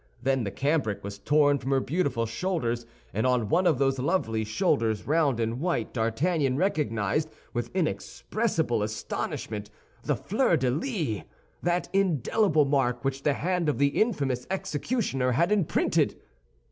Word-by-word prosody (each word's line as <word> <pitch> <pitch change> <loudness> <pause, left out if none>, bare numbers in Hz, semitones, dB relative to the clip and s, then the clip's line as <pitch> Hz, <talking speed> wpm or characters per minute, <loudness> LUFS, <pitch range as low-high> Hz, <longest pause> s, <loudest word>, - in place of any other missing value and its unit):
Then 135 -2 +1
the - - -1
cambric 130 -5 0
was 100 0 -6
torn 145 +4 +3
from 130 - -5
her 135 -1 +3
beautiful 140 -5 0
shoulders; 120 -3 -2 0.3
and 110 +5 +1
on 125 -4 +1
one 180 - +3
of 155 - +3
those 135 0 +1
lovely 125 -7 0
shoulders, 110 0 0
round 145 -5 +2
and 115 +2 -1
white, 155 -9 -1
D'Artagnan 130 +5 +1
recognized, 150 - 0 0.2
with 120 0 -2
inexpressible 165 - -1
astonishment, 105 0 -4 0.3
the - - 0
fleur 210 -4 +1
de 130 -3 +1
lis—that 175 - -3
indelible 180 - +2
mark 135 -2 +1
which 135 0 -1
the 145 - +2
hand 175 +1 0
of 150 - 0
the 140 0 +4
infamous 140 - 0
executioner 150 - -1
had 170 - +2
imprinted. 200 -7 +2
135 Hz, 140 wpm, -27 LUFS, 115-170 Hz, 0.3 s, the